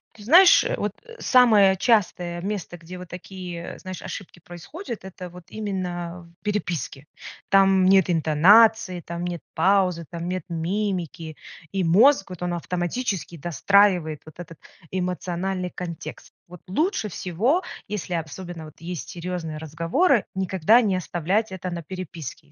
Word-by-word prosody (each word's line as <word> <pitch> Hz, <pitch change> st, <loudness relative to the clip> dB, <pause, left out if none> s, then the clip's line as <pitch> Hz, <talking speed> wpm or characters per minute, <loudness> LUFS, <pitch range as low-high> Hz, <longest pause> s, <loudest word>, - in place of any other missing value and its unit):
Ты 210 Hz, -, -13 dB
знаешь, 350 Hz, -, +8 dB
э, -, -, 0 dB
вот -, -, -1 dB, 0.3 s
самое 215 Hz, -7 st, +5 dB
частое 180 Hz, -5 st, +1 dB
место, 195 Hz, -2 st, -4 dB
где 170 Hz, +2 st, -10 dB
вот 180 Hz, 0 st, -9 dB
такие, 180 Hz, -1 st, -8 dB
знаешь, 185 Hz, -1 st, -7 dB
ошибки 185 Hz, -3 st, -8 dB
происходят, 210 Hz, -, -9 dB
это 185 Hz, -1 st, -8 dB
вот 180 Hz, 0 st, -13 dB
именно 180 Hz, -4 st, -4 dB, 0.2 s
в -, -, -44 dB
переписке. 175 Hz, -9 st, -3 dB, 0.4 s
Там 195 Hz, -1 st, +5 dB
нет 190 Hz, -1 st, +5 dB
интонации, 185 Hz, +5 st, +5 dB
там 170 Hz, 0 st, -6 dB
нет 175 Hz, -3 st, -4 dB
паузы, 180 Hz, -1 st, +2 dB
там 170 Hz, 0 st, -5 dB
нет 185 Hz, -1 st, -3 dB
мимики, 170 Hz, -2 st, -3 dB, 0.3 s
и 195 Hz, -2 st, -1 dB
мозг 195 Hz, -, +5 dB
вот 180 Hz, -, -9 dB
он 175 Hz, 0 st, -1 dB
автоматически 175 Hz, +2 st, -3 dB
достраивает 175 Hz, 0 st, +2 dB
вот 155 Hz, +1 st, -15 dB
этот 165 Hz, -2 st, -10 dB, 0.3 s
эмоциональный 180 Hz, 0 st, -2 dB
контекст. 170 Hz, -2 st, -8 dB, 0.2 s
Вот 180 Hz, 0 st, -11 dB
лучше 310 Hz, -, 0 dB
всего, 210 Hz, -, 0 dB, 0.2 s
если 195 Hz, -3 st, -4 dB
особенно 165 Hz, +1 st, -5 dB
вот 155 Hz, -, -12 dB
есть 175 Hz, 0 st, -6 dB
серьезные 170 Hz, -3 st, -5 dB
разговоры, 165 Hz, -, +1 dB
никогда 190 Hz, +4 st, +4 dB
не 195 Hz, -5 st, +1 dB
оставлять 185 Hz, +5 st, -1 dB
это 185 Hz, 0 st, -5 dB
на 170 Hz, -1 st, -4 dB
переписке. 170 Hz, -4 st, -8 dB
180 Hz, 140 wpm, -24 LUFS, 170-200 Hz, 0.4 s, знаешь